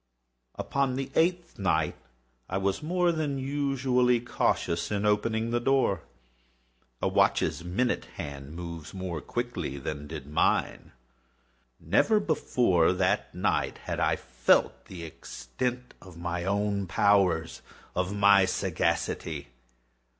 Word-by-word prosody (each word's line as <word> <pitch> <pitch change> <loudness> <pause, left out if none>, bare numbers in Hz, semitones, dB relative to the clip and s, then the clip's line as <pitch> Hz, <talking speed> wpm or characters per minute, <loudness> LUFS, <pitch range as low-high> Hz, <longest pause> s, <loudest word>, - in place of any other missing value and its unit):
Upon 140 -2 -1
the 135 0 -4
eighth 175 -5 +1
night 80 -5 +1 0.6
I - - -1
was 95 0 0
more 175 +2 +2
than 155 -4 -1
usually 130 -3 +1
cautious 85 -7 0
in 105 0 -1
opening 110 +2 +1
the 120 - +2
door. 120 -8 +2 1.0
A - - +3
watch's 85 - +2
minute 95 +9 0
hand 70 +1 -7
moves 85 -1 -7
more 90 -4 -4
quickly 115 - -3
than 70 +2 -5
did 75 -3 -7
mine. 75 +2 0 0.9
Never 220 -1 +3
before 120 - +2
that 90 - 0
night - - 0
had - - -5
I - - +2
felt - - +1
the 90 -3 -9
extent 125 - -5
of 90 -3 -13
my 85 0 -3
own 100 0 0
powers—of 90 -1 0
my 100 -1 +6
sagacity. 80 -5 -1
100 Hz, 115 wpm, -28 LUFS, 85-125 Hz, 1.0 s, my